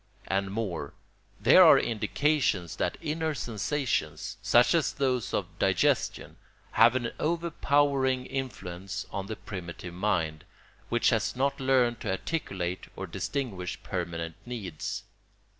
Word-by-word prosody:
And 95 Hz, 0 st, 0 dB
more: 95 Hz, -9 st, -3 dB, 0.4 s
there -, -, +8 dB
are -, -, +9 dB
indications 115 Hz, -, 0 dB
that -, -, -1 dB
inner 160 Hz, -1 st, -1 dB
sensations, 115 Hz, -, -2 dB
such 120 Hz, +6 st, +5 dB
as 165 Hz, -3 st, +2 dB
those 130 Hz, -4 st, 0 dB
of -, -, -3 dB
digestion, -, -, +1 dB, 0.3 s
have 115 Hz, +2 st, +6 dB
an 120 Hz, -2 st, -1 dB
overpowering 145 Hz, -5 st, +1 dB
influence 100 Hz, -8 st, -5 dB
on 100 Hz, -1 st, -4 dB
the 110 Hz, -, -4 dB
primitive 90 Hz, -3 st, -7 dB
mind, 85 Hz, -5 st, -1 dB, 0.5 s
which 120 Hz, 0 st, +3 dB
has 110 Hz, 0 st, 0 dB
not 140 Hz, +2 st, 0 dB
learned 130 Hz, -3 st, +2 dB
to -, -, -3 dB
articulate 95 Hz, -, -3 dB
or 95 Hz, -, -4 dB
distinguish 95 Hz, -, -3 dB
permanent 85 Hz, -1 st, -3 dB
needs. 105 Hz, -10 st, -5 dB
115 Hz, 120 wpm, -29 LUFS, 95-135 Hz, 0.5 s, are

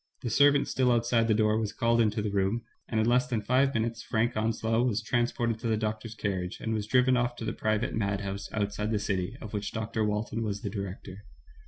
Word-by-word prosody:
The 120 Hz, -, -2 dB
servant 145 Hz, +3 st, +5 dB
still 130 Hz, -1 st, +2 dB
outside 115 Hz, -1 st, +2 dB
the 110 Hz, -, +3 dB
door 110 Hz, 0 st, +3 dB
was 110 Hz, -2 st, -2 dB
called 115 Hz, 0 st, +2 dB
into 105 Hz, -1 st, +1 dB
the 105 Hz, -, -1 dB
room, 100 Hz, +4 st, 0 dB, 0.2 s
and 110 Hz, -, -1 dB
in 110 Hz, -, +3 dB
less 125 Hz, +1 st, +3 dB
than 120 Hz, -3 st, -1 dB
five 130 Hz, +6 st, +2 dB
minutes 115 Hz, +1 st, -1 dB
Frank 120 Hz, +2 st, 0 dB
Onslow 110 Hz, +1 st, +1 dB
was 120 Hz, -4 st, +1 dB
trans 120 Hz, +2 st, +1 dB
ported 115 Hz, -3 st, -1 dB
to 115 Hz, -, -3 dB
the 110 Hz, -1 st, +1 dB
doctor's 110 Hz, +1 st, -3 dB
carriage, 95 Hz, -4 st, -3 dB
and 110 Hz, -, -2 dB
was 105 Hz, -1 st, -2 dB
driven 125 Hz, +2 st, +4 dB
off 120 Hz, 0 st, 0 dB
to 115 Hz, -, -6 dB
the -, -, -2 dB
private 110 Hz, +1 st, -1 dB
madhouse 100 Hz, -2 st, -2 dB
outside 105 Hz, 0 st, -2 dB
the 110 Hz, -, +1 dB
city, 100 Hz, +1 st, -2 dB
of 110 Hz, -, -8 dB
which 105 Hz, -1 st, -3 dB
Dr. 110 Hz, 0 st, -2 dB
Walton 105 Hz, +2 st, -1 dB
was 100 Hz, -2 st, -2 dB
the -, -, -4 dB
director. 100 Hz, -1 st, -6 dB
110 Hz, 225 wpm, -29 LUFS, 105-120 Hz, 0.2 s, servant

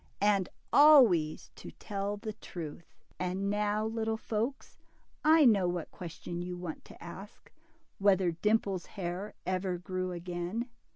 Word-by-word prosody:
And 200 Hz, -2 st, +2 dB, 0.2 s
always 240 Hz, -, +6 dB
to -, -, -9 dB
tell 200 Hz, 0 st, -4 dB
the 215 Hz, 0 st, -5 dB
truth. 170 Hz, -6 st, -8 dB, 0.3 s
And 185 Hz, +2 st, -1 dB
now, 210 Hz, +1 st, 0 dB
little 220 Hz, 0 st, -1 dB
folks, 230 Hz, +5 st, -3 dB, 0.4 s
I 310 Hz, 0 st, +6 dB
know 200 Hz, -7 st, +5 dB
what 175 Hz, -2 st, -3 dB
question 175 Hz, 0 st, -6 dB
you 180 Hz, 0 st, -5 dB
want 175 Hz, -3 st, -6 dB
to -, -, -13 dB
ask: 195 Hz, +5 st, -11 dB, 0.5 s
whether 190 Hz, -3 st, +4 dB
Dimple's 195 Hz, +1 st, 0 dB
hair 185 Hz, +2 st, -4 dB
ever 185 Hz, 0 st, -1 dB
grew 185 Hz, +1 st, -3 dB
again. 175 Hz, +6 st, -4 dB
195 Hz, 130 wpm, -31 LUFS, 175-215 Hz, 0.5 s, always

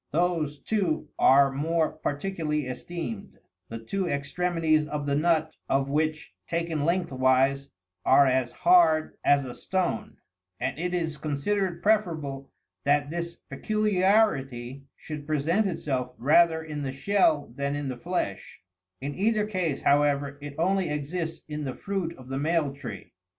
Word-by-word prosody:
Those, 160 Hz, -3 st, 0 dB
too, 165 Hz, -6 st, -1 dB
are 140 Hz, +1 st, +6 dB
more 160 Hz, +4 st, 0 dB
particularly 155 Hz, -1 st, -2 dB
esteemed, 175 Hz, -, -6 dB, 0.3 s
the 115 Hz, -, -5 dB
two 185 Hz, +13 st, -3 dB
extre 170 Hz, +4 st, -1 dB
mities 155 Hz, -2 st, +2 dB
of 150 Hz, -1 st, -3 dB
the 140 Hz, -1 st, 0 dB
nut 155 Hz, 0 st, +1 dB
of 135 Hz, 0 st, +1 dB
which, 155 Hz, -6 st, -1 dB
taken 165 Hz, -3 st, -1 dB
lengthwise, 135 Hz, -5 st, +2 dB, 0.4 s
are 140 Hz, -, +6 dB
as 130 Hz, -2 st, +1 dB
hard 170 Hz, -3 st, +4 dB
as 140 Hz, -1 st, +4 dB
a 125 Hz, -, -6 dB
stone: 185 Hz, +5 st, -2 dB, 0.4 s
and 145 Hz, -, -2 dB
it 180 Hz, +1 st, -1 dB
is 160 Hz, -3 st, -2 dB
considered 170 Hz, +5 st, -1 dB
preferable 160 Hz, -11 st, 0 dB, 0.3 s
that 145 Hz, +1 st, +2 dB
this 170 Hz, 0 st, -4 dB
peculiarity 185 Hz, -, +1 dB
should 150 Hz, -2 st, -8 dB
present 160 Hz, +8 st, +1 dB
itself 130 Hz, -8 st, -3 dB
rather 160 Hz, +5 st, +4 dB
in 150 Hz, -2 st, -5 dB
the 135 Hz, -2 st, -3 dB
shell 150 Hz, -3 st, +1 dB
than 140 Hz, 0 st, -2 dB
in 145 Hz, -1 st, -3 dB
the 130 Hz, -, -3 dB
flesh: 120 Hz, -, -4 dB, 0.4 s
in 140 Hz, +2 st, -3 dB
either 210 Hz, +3 st, +1 dB
case, 185 Hz, -8 st, -2 dB
however, 145 Hz, -1 st, +2 dB
it 145 Hz, -1 st, -7 dB
only 185 Hz, +1 st, +1 dB
exists 160 Hz, +3 st, -3 dB
in 150 Hz, -1 st, -4 dB
the 130 Hz, -3 st, -4 dB
fruit 195 Hz, -4 st, -3 dB
of 130 Hz, -1 st, -13 dB
the 135 Hz, 0 st, -2 dB
male 155 Hz, -2 st, +1 dB
tree. 120 Hz, -9 st, -9 dB
155 Hz, 145 wpm, -27 LUFS, 140-175 Hz, 0.4 s, are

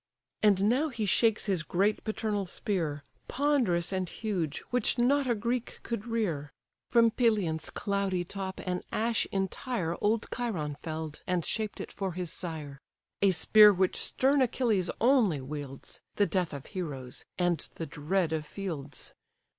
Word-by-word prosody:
And 200 Hz, -2 st, +4 dB
now 270 Hz, +8 st, +2 dB
he 235 Hz, -5 st, -3 dB
shakes 220 Hz, +3 st, +3 dB
his 190 Hz, -4 st, +1 dB
great 195 Hz, +6 st, +1 dB
paternal 215 Hz, -3 st, -2 dB
spear, 165 Hz, -6 st, -1 dB, 0.2 s
Ponderous 245 Hz, -, +1 dB
and 185 Hz, -2 st, -1 dB
huge, 185 Hz, -9 st, -2 dB
which 250 Hz, +1 st, +2 dB
not 265 Hz, +2 st, +3 dB
a 240 Hz, -, +3 dB
Greek 235 Hz, +3 st, -2 dB
could 230 Hz, -1 st, -4 dB
rear, 175 Hz, -11 st, -1 dB, 0.4 s
From 230 Hz, -1 st, +5 dB
Pelion's 210 Hz, -10 st, +1 dB
cloudy 200 Hz, -3 st, -1 dB
top 190 Hz, 0 st, -5 dB
an 180 Hz, -1 st, -1 dB
ash 230 Hz, 0 st, +1 dB
entire 195 Hz, -2 st, -2 dB
Old 215 Hz, +2 st, +2 dB
Chiron 180 Hz, -12 st, -2 dB
fell'd, 155 Hz, -1 st, -5 dB
and 180 Hz, -3 st, 0 dB
shaped 215 Hz, -2 st, -2 dB
it -, -, -6 dB
for 195 Hz, -3 st, -3 dB
his 180 Hz, -1 st, -4 dB
sire; 155 Hz, -6 st, -6 dB, 0.4 s
A 200 Hz, -, +5 dB
spear 210 Hz, +3 st, +7 dB
which 185 Hz, -1 st, +1 dB
stern 275 Hz, +2 st, +2 dB
Achilles 225 Hz, -7 st, +1 dB
only 230 Hz, -, +4 dB
wields, 135 Hz, 0 st, -7 dB
The 205 Hz, -, +3 dB
death 185 Hz, -4 st, 0 dB
of 140 Hz, -2 st, -7 dB
heroes, 140 Hz, -10 st, -6 dB
and 175 Hz, -2 st, +2 dB, 0.2 s
the 165 Hz, -, -4 dB
dread 160 Hz, +3 st, -1 dB
of 155 Hz, -1 st, -1 dB
fields. 155 Hz, -4 st, -4 dB
195 Hz, 150 wpm, -30 LUFS, 165-225 Hz, 0.4 s, spear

